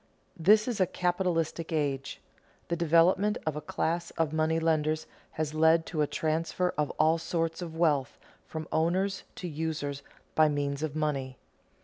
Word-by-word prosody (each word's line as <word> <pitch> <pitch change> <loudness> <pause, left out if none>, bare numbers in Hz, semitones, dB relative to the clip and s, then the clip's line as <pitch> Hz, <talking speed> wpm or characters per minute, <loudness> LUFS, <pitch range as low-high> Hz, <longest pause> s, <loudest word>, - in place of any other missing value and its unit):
_ - - -38 0.3
This 210 +6 +4
is 235 -4 -2
a 185 - +4
capitalistic 175 -3 -1
age. 140 -4 -1 0.5
The 170 - +1
development 170 +6 +3
of 155 -2 -1
a 150 - -4
class 170 +3 -2
of 160 -2 0
money 160 +1 +1
lenders 155 -1 +1 0.3
has 155 -1 -2
led 160 +1 +4
to 155 -3 -2
a 150 - +2
transfer 165 +4 -1
of 150 -1 0
all 160 +2 +3
sorts 165 0 -2
of 165 -2 -6
wealth 150 -6 +1 0.3
from 160 -1 -6
owners 185 +4 0
to 180 - -5
users 150 -3 -3 0.3
by 155 -1 +5
means 145 -1 -1
of 155 -2 -3
money. 140 -4 -2
160 Hz, 160 wpm, -29 LUFS, 150-170 Hz, 0.5 s, by